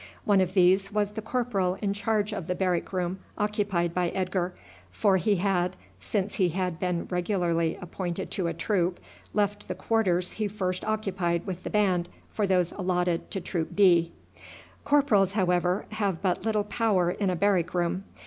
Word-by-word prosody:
One 200 -2 +4
of 185 0 -1
these 190 +2 +4
was 210 -1 0
the 220 +1 -5
corporal 215 -6 0
in 200 -2 0
charge 210 0 0
of 190 -5 -5
the 180 - -1
barrack 180 -2 0
room 185 0 -2 0.2
occupied 205 -5 0
by 180 -1 +1
Edgar, 185 -1 -1 0.4
for 190 - +2
he 205 +2 +2
had, 185 -1 0 0.2
since 200 -1 -2
he 185 -3 +2
had 180 -1 -2
been 180 -2 -1
regularly 175 -3 0
appointed 175 0 -4
to 185 -3 -1
a 165 - -1
troop, 175 0 0 0.4
left 205 0 0
the 185 - -3
quarters 185 -3 +1
he 215 -1 -2
first 185 -3 -2
occupied 195 -6 -1
with 185 -2 -5
the - - -4
band 185 -4 +1 0.2
for 210 -2 0
those 180 -2 +2
allotted 180 -3 -1
to 195 - -2
troop 170 -2 -3
D. 175 -4 +5 0.7
Corporals, 220 -10 +3
however, 180 -1 +1
have 200 -5 -1
but 185 -2 0
little 215 -1 +1
power 205 -5 +1
in 195 +1 -1
a 180 - 0
barrack 180 -2 +1
room. 175 +2 0
185 Hz, 170 wpm, -27 LUFS, 175-205 Hz, 0.7 s, D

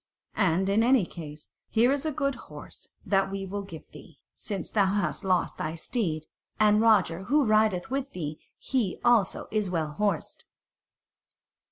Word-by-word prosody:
And 190 -1 +2
in 200 +3 +3
any 245 -4 +4
case, 150 -3 -10 0.2
here 235 +3 +3
is 285 +2 -1
a - - 0
good 275 -1 -1
horse - - -12 0.2
that 195 -1 +2
we 195 0 -4
will 200 +2 -4
give 175 -6 -11
thee, - - -14 0.2
since 195 -5 -5
thou 200 -3 +3
hast 205 +2 -1
lost 185 -2 0
thy 155 +1 -3
steed; 165 -4 -2 0.3
and 210 0 +5
Roger 190 -5 +3
who 290 +4 +3
rideth 215 -2 +2
with 275 0 -2
thee, 155 -3 -5 0.2
he 235 -8 -1
also 235 -5 +3
is 210 -3 0
well 160 -4 -1
horsed." 195 +1 -2
200 Hz, 160 wpm, -27 LUFS, 175-225 Hz, 0.3 s, and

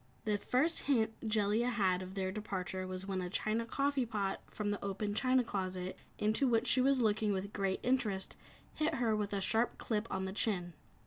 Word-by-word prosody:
The 210 -2 +1
first 310 +11 +2
hint 225 -5 +3
Jellia 215 +2 +2
had 190 -6 +2
of 185 +1 -7
their 190 -1 -1
departure 190 -2 -4
was 185 0 -5
when 190 -1 -2
a 180 - -3
china 220 +4 -1
coffee 275 0 +1
pot 205 -3 -1
from 205 -1 -2
the 205 - -3
open 200 +1 -2
china 255 +3 +3
closet 185 -3 -3 0.2
into 220 +6 +2
which 230 -1 +3
she 255 +1 +3
was 270 0 +4
looking 215 -1 +2
with 195 +2 -3
great 195 -2 0
interest, 215 -7 0 0.4
hit 310 +1 0
her 240 -3 +1
a 205 -2 -1
sharp 225 +4 +1
clip 215 -1 -1
on 190 0 -2
the 190 - -4
chin. 180 -5 0
210 Hz, 190 wpm, -34 LUFS, 190-235 Hz, 0.4 s, was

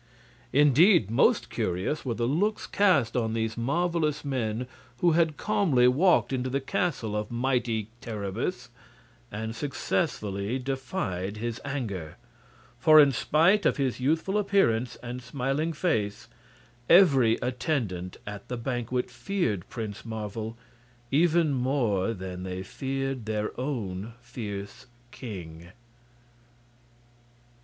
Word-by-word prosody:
Indeed, 145 - +5
most 115 - +3
curious 95 - -2
were 120 -4 -2
the 115 - -1
looks 200 - 0
cast 155 - +2
on 115 -2 0
these 110 0 -1
marvelous 155 +3 0
men 125 -3 -2 0.3
who 175 - +4
had 160 -2 +2
calmly 190 -13 +3
walked 155 +3 +3
into 130 0 -1
the 135 +2 0
castle 135 -6 -2
of 105 0 -2
mighty 120 -3 0
Terribus 115 - -4 0.6
and 110 +2 -4
successfully 115 - -2
defied 130 - -3
his 115 +1 -4
anger; 110 - -4 0.6
for 155 +4 +7
in 145 -2 +7
spite 170 - +3
of - - +2
his 135 -4 -1
youthful 160 +9 +1
appearance 130 - +2
and 120 +1 -5
smiling 135 +5 -1
face 115 - -1 0.6
every 135 -11 +6
attendant 120 - -2
at 105 -1 -8
the 125 - -4
banquet 125 0 -2
feared 175 - -2
Prince 110 -3 -6
Marvel 110 0 -5 0.5
even 160 +1 +3
more 125 -6 +1
than 90 -1 -6
they 95 0 -4
feared 135 -1 -3
their 105 -1 -1
own 115 -6 -3
fierce 105 -3 -7 0.2
king. 85 -10 -8
125 Hz, 115 wpm, -27 LUFS, 110-150 Hz, 0.6 s, for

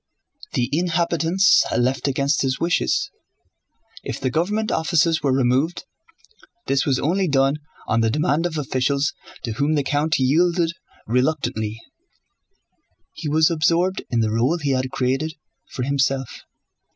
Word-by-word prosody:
The 120 - +1
inhabitants 170 +2 +3
left 130 +3 0
against 140 +1 +1
his 130 -1 -1
wishes. 175 - 0 0.9
If - - -5
the 130 -1 -1
government 210 - 0
offices 160 0 +2
were 140 -2 +1
removed, 130 +6 +1 0.8
this 135 0 0
was 135 -2 +2
only 185 +7 0
done 135 -1 +2 0.3
on 115 +1 +1
the 115 - +2
demand 150 +5 +1
of 160 -2 -6
officials 140 +1 0 0.3
to 115 - -3
whom 140 +7 0
the 145 - +1
count 150 +3 0
yielded 165 +5 +2 0.3
reluctantly. 115 -4 -1 1.3
He 155 - -5
was 155 +2 +3
absorbed 170 +3 +1
in 120 -3 +1
the 110 -1 0
role 125 +9 +1
he 145 -4 -1
had 130 0 0
created 135 +5 -1 0.3
for 125 - -4
himself. 135 -1 -1
145 Hz, 135 wpm, -22 LUFS, 130-165 Hz, 1.3 s, inhabitants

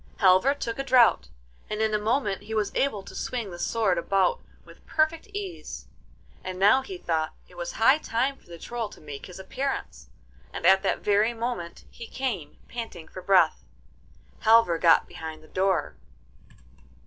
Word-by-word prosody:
Halvor 195 +8 +5
took 235 -3 -4
a - - 0
draught, 245 - +4 0.4
and 210 - -3
in 220 0 +1
a 210 - +2
moment 210 -3 0
he 220 +2 -6
was 210 -2 0
able 215 -8 0
to - - -12
swing 235 -6 -4
the 175 - -9
sword 200 -4 +1
about 195 - +1 0.2
with - - -17
perfect 315 +4 0
ease. 400 -4 -7 0.6
And 185 0 -5
now 205 +8 +5
he 375 +7 -8
thought 160 - -2
it - - -20
was 175 -1 -5
high 265 +7 +4
time 260 +1 -1
for - - -26
the 170 -1 -10
Troll 230 +4 -4
to - - -14
make 145 -2 -9
his 180 - -11
appearance, 190 - -4 0.4
and - - -6
at 190 0 +6
that 195 - -1
very 210 +3 +2
moment 230 -7 -4
he 230 - -9
came, 230 - -4
panting 225 -9 -7
for 185 - -9
breath. 180 -3 +3 0.8
Halvor 220 -7 +5
got 165 -1 +5
behind 160 -1 -8
the - - -16
door. 190 0 0
210 Hz, 170 wpm, -26 LUFS, 180-245 Hz, 0.8 s, at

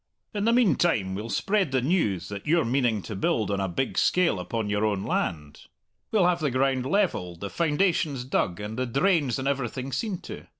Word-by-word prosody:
In 205 0 -1
the 230 - +4
meantime 175 - +2
we'll 105 +4 -5
spread 195 - 0
the 130 - +2
news 120 - 0
that 100 -1 -7
you're 165 -1 +3
meaning 120 -4 +1
to 110 - -6
build 100 +2 0
on 100 - 0
a 95 - 0
big 110 +9 -1
scale 180 -2 +2
upon 115 -3 -3
your 105 +1 0
own 100 -3 0
land; 75 -3 -3 0.4
we'll 205 -5 +3
have 175 -1 +2
the 155 -3 0
ground 130 0 +1
levelled, 115 - 0
the 100 - -5
foundations 160 -4 +1
dug, 90 -8 -1
and 105 +3 -5
the 130 - 0
drains 140 - +2
and 135 0 -3
everything 135 -1 -2
seen 205 - -2
to. - - -9
130 Hz, 200 wpm, -26 LUFS, 105-170 Hz, 0.4 s, the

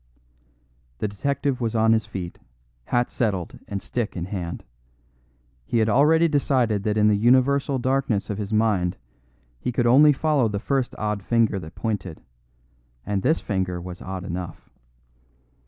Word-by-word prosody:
The 105 - -1
detective 135 +5 -2
was 115 -1 -1
on 110 0 +4
his 110 -1 0
feet, 90 -3 -6 0.5
hat 120 0 0
settled 100 -7 -2
and 100 -1 -4
stick 115 -5 -3
in 85 - -3
hand. 90 -3 -5 1.0
He 115 - -1
had 110 0 +3
already 155 +8 +4
decided 130 -8 +1
that 105 0 0
in 105 0 +4
the 105 - +4
universal 130 +5 +3
darkness 130 -5 0
of 105 - -4
his 105 0 -4
mind 105 -5 +1 0.6
he 125 - -2
could 120 0 0
only 140 +5 +7
follow 145 -3 +2
the 105 -2 -2
first 130 +4 -1
odd 105 -1 -2
finger 115 -1 +1
that 80 -3 -10
pointed; 100 -7 -3 0.9
and 100 -2 -1
this 160 +10 +2
finger 95 -3 -2
was 90 0 -8
odd 95 -1 -5
enough. 90 -2 -6
110 Hz, 155 wpm, -24 LUFS, 95-130 Hz, 1.0 s, only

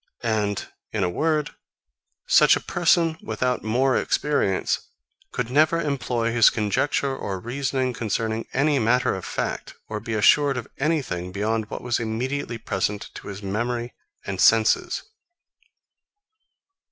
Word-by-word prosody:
And 105 -3 -1 0.2
in - - -1
a 90 - 0
word, 155 - 0 0.7
such - - +6
a - - -1
person, 170 -2 +2
without 125 +3 -1
more 125 +5 +2
experience, 140 -10 0 0.4
could 125 -1 -3
never 155 +4 +4
employ 125 -6 -1
his 115 -1 +6
conjecture 135 +6 0
or 95 -7 -4
reasoning 130 +3 -2
concerning 110 0 -2
any 145 +1 +2
matter 125 +2 +2
of 95 - -5
fact, - - -4
or 110 -1 -4
be 110 +1 -4
assured 140 +6 +4
of 120 - -5
anything 135 - -1
beyond 105 +2 -1
what - - -6
was 120 -2 0
immediately 120 +2 -3
present 105 0 -2
to - - -10
his 100 0 -7
memory 120 +4 -2 0.3
and - - -3
senses. - - +3
120 Hz, 130 wpm, -24 LUFS, 110-140 Hz, 0.7 s, such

